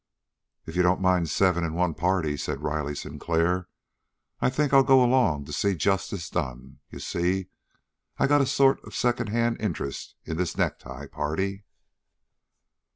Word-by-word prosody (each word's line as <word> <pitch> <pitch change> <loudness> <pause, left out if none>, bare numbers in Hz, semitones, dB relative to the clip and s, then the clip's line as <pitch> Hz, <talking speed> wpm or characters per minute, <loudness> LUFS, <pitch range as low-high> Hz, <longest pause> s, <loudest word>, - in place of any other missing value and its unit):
"If 80 - -8
you 90 - +3
don't 90 +1 +3
mind 90 -3 +2
seven 90 +1 +2
in 80 -1 -2
one 90 -1 +1
party," 85 -3 0
said - - -4
Riley 75 -1 -2
Sinclair, 85 +4 -1 0.7
"I - - +2
think 145 +2 0
I'll 135 - +8
go 135 -1 +6
along 120 - +2
to - - -8
see 100 -1 +1
justice 95 -1 -1
done. 65 +1 -5
You - - -9
see, 90 +2 -1 0.7
I - - +3
got 145 +1 +4
a 135 - +1
sort 135 0 +3
of - - -11
secondhand 120 -1 0
interest 85 -9 -4
in 80 - -4
this 90 -1 -2
necktie - - -3
party." 95 +7 -3
90 Hz, 155 wpm, -26 LUFS, 80-115 Hz, 0.7 s, I'll